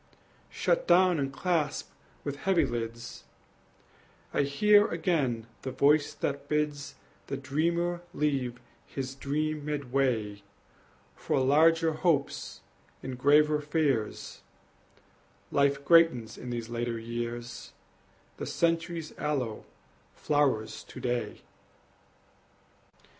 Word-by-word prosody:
Shut -, -, 0 dB
down 180 Hz, -2 st, +5 dB
and 135 Hz, -1 st, -1 dB
clasp 160 Hz, -1 st, -1 dB, 0.3 s
the 140 Hz, -, -3 dB
heavy 175 Hz, +2 st, +2 dB
lids; 115 Hz, -2 st, -5 dB, 1.1 s
I -, -, +2 dB
hear 205 Hz, +10 st, +4 dB
again 150 Hz, -9 st, 0 dB, 0.2 s
the 130 Hz, -, -4 dB
voice 145 Hz, +3 st, +3 dB
that 140 Hz, 0 st, -3 dB
bids 150 Hz, -1 st, -1 dB, 0.3 s
The 140 Hz, -, -3 dB
dreamer 170 Hz, +6 st, -1 dB
leave 135 Hz, -5 st, -1 dB, 0.3 s
his 130 Hz, -1 st, -5 dB
dream 150 Hz, +2 st, -2 dB
midway 130 Hz, -8 st, -1 dB, 0.7 s
For -, -, -1 dB
larger 160 Hz, +5 st, +4 dB
hopes 155 Hz, -3 st, -1 dB, 0.4 s
and 130 Hz, 0 st, -4 dB
graver 150 Hz, +3 st, +4 dB
fears 145 Hz, -7 st, -1 dB, 1.1 s
Life 140 Hz, 0 st, +2 dB
greatens 165 Hz, -10 st, +4 dB
in 125 Hz, -, -8 dB
these 120 Hz, -2 st, -4 dB
later 120 Hz, 0 st, -3 dB
years, 120 Hz, +1 st, -5 dB, 0.7 s
The -, -, -5 dB
century's 165 Hz, -1 st, -1 dB
aloe 135 Hz, -7 st, -2 dB, 0.5 s
flowers 140 Hz, -7 st, 0 dB
to -, -, -10 dB
day! 120 Hz, -1 st, -2 dB
140 Hz, 100 wpm, -29 LUFS, 125-160 Hz, 1.1 s, down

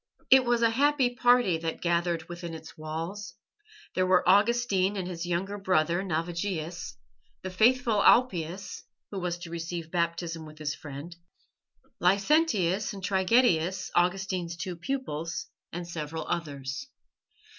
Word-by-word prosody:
It 260 Hz, -1 st, +8 dB
was 240 Hz, -1 st, +2 dB
a 230 Hz, -, +4 dB
happy 275 Hz, 0 st, +3 dB
party 245 Hz, -7 st, +3 dB
that 165 Hz, 0 st, -3 dB
gathered 170 Hz, -1 st, 0 dB
within 175 Hz, -1 st, -6 dB
its 160 Hz, 0 st, -11 dB
walls. 165 Hz, +6 st, -5 dB, 0.6 s
There 185 Hz, 0 st, +1 dB
were 185 Hz, -1 st, +3 dB
Augustine 205 Hz, -1 st, +3 dB
and 185 Hz, -2 st, -3 dB
his 175 Hz, -1 st, -5 dB
younger 195 Hz, +4 st, -2 dB
brother 175 Hz, -2 st, +2 dB
Navigius; 170 Hz, 0 st, -3 dB, 0.5 s
the 185 Hz, -, -4 dB
faithful 230 Hz, +2 st, +3 dB
Alypius, 185 Hz, -6 st, +2 dB, 0.3 s
who 200 Hz, -, -4 dB
was 175 Hz, -1 st, -2 dB
to 170 Hz, -1 st, -9 dB
receive 165 Hz, -1 st, -5 dB
Baptism 170 Hz, -1 st, -1 dB
with 155 Hz, 0 st, -12 dB
his 155 Hz, 0 st, -2 dB
friend; 155 Hz, +3 st, -8 dB, 0.8 s
Licentius 200 Hz, -, +2 dB
and 195 Hz, -1 st, -9 dB
Trigetius, 190 Hz, -2 st, +2 dB
Augustine's 180 Hz, -1 st, 0 dB
two 180 Hz, 0 st, -4 dB
pupils; 170 Hz, -, -4 dB, 0.3 s
and 175 Hz, 0 st, -5 dB
several 160 Hz, -1 st, -5 dB
others. 140 Hz, -, -4 dB
180 Hz, 130 wpm, -28 LUFS, 165-205 Hz, 0.8 s, It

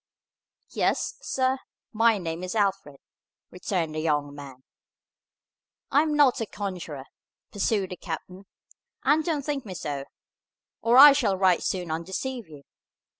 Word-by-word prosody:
"Yes, -, -, 0 dB
sir, 260 Hz, 0 st, 0 dB, 0.3 s
my 225 Hz, 0 st, +4 dB
name 170 Hz, -1 st, -5 dB
is 185 Hz, +4 st, -4 dB
Alfred," 195 Hz, -9 st, -1 dB, 0.5 s
returned 180 Hz, -3 st, -2 dB
the 155 Hz, -, -3 dB
young 150 Hz, -2 st, -1 dB
man. 135 Hz, -3 st, -11 dB, 1.3 s
"I 285 Hz, -, +5 dB
am 305 Hz, -1 st, 0 dB
not 280 Hz, -5 st, +4 dB
a 225 Hz, -, -2 dB
conjurer," 180 Hz, -10 st, -6 dB, 0.5 s
pursued 205 Hz, -2 st, -1 dB
the 180 Hz, -, -6 dB
captain, 180 Hz, +4 st, -7 dB, 0.6 s
"and 310 Hz, +2 st, +3 dB
don't 310 Hz, -5 st, -2 dB
think 285 Hz, -3 st, -2 dB
me 190 Hz, -4 st, -8 dB
so, 145 Hz, -4 st, -4 dB, 0.8 s
or 235 Hz, +2 st, +3 dB
I 285 Hz, +1 st, +11 dB
shall 225 Hz, -9 st, +1 dB
right 185 Hz, -2 st, +3 dB
soon 180 Hz, -3 st, -2 dB
undeceive 190 Hz, +7 st, -4 dB
you. 145 Hz, -2 st, -13 dB
190 Hz, 135 wpm, -26 LUFS, 160-245 Hz, 1.3 s, I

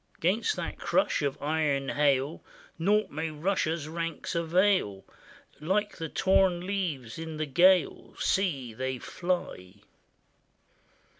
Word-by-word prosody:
'Gainst 215 Hz, -, +1 dB
that -, -, -5 dB
crush -, -, +1 dB
of 140 Hz, -2 st, -2 dB
iron 145 Hz, -3 st, 0 dB
hail 145 Hz, +1 st, +1 dB, 0.4 s
Naught 210 Hz, +5 st, +2 dB
may 160 Hz, +2 st, -3 dB
Russia's 160 Hz, -1 st, -1 dB
ranks 165 Hz, +1 st, -4 dB
avail; 170 Hz, -, +1 dB, 0.5 s
Like 195 Hz, +7 st, -1 dB
the 160 Hz, -1 st, -4 dB
torn 190 Hz, -2 st, +2 dB
leaves 165 Hz, -, -3 dB
in 160 Hz, -1 st, -6 dB
the 155 Hz, -, -1 dB
gale, 175 Hz, +5 st, +3 dB
See, 140 Hz, -, 0 dB
they 130 Hz, +3 st, -3 dB
fly! 125 Hz, -, -4 dB
160 Hz, 115 wpm, -28 LUFS, 140-185 Hz, 0.5 s, gale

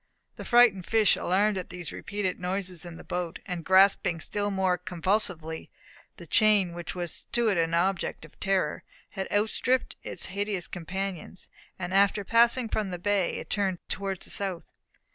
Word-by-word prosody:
The -, -, -8 dB
frightened 235 Hz, -7 st, +5 dB
fish, 220 Hz, -4 st, +4 dB
alarmed 195 Hz, +2 st, +1 dB
at 180 Hz, -, -7 dB
these 180 Hz, -2 st, -7 dB
repeated 205 Hz, -3 st, -3 dB
noises 180 Hz, -1 st, -3 dB
in 170 Hz, -1 st, -8 dB
the -, -, -11 dB
boat, 175 Hz, -2 st, -3 dB
and 175 Hz, -2 st, -4 dB
grasping 190 Hz, -2 st, +4 dB
still 205 Hz, +5 st, -2 dB
more 190 Hz, -2 st, +1 dB
convulsively 180 Hz, -2 st, -2 dB, 0.5 s
the -, -, -10 dB
chain 210 Hz, -5 st, +4 dB
which 175 Hz, +1 st, -6 dB
was 175 Hz, -2 st, -5 dB
to 235 Hz, -2 st, +3 dB
it 195 Hz, -, +1 dB
an 165 Hz, 0 st, +1 dB
object 185 Hz, +2 st, 0 dB
of -, -, -19 dB
terror, 190 Hz, -6 st, 0 dB, 0.3 s
had 190 Hz, -1 st, -5 dB
outstripped 225 Hz, +5 st, +1 dB
its -, -, -2 dB
hideous 200 Hz, -1 st, -2 dB
companions, 190 Hz, +1 st, -5 dB, 0.3 s
and 180 Hz, 0 st, -4 dB
after 200 Hz, +1 st, +3 dB
passing 235 Hz, +3 st, +4 dB
from 215 Hz, -2 st, -1 dB
the 180 Hz, -, -4 dB
bay 195 Hz, 0 st, 0 dB
had -, -, -8 dB
turned 195 Hz, -3 st, +1 dB
towards 195 Hz, -2 st, -2 dB
the -, -, -3 dB
south. 190 Hz, -4 st, -2 dB
190 Hz, 165 wpm, -28 LUFS, 180-205 Hz, 0.5 s, frightened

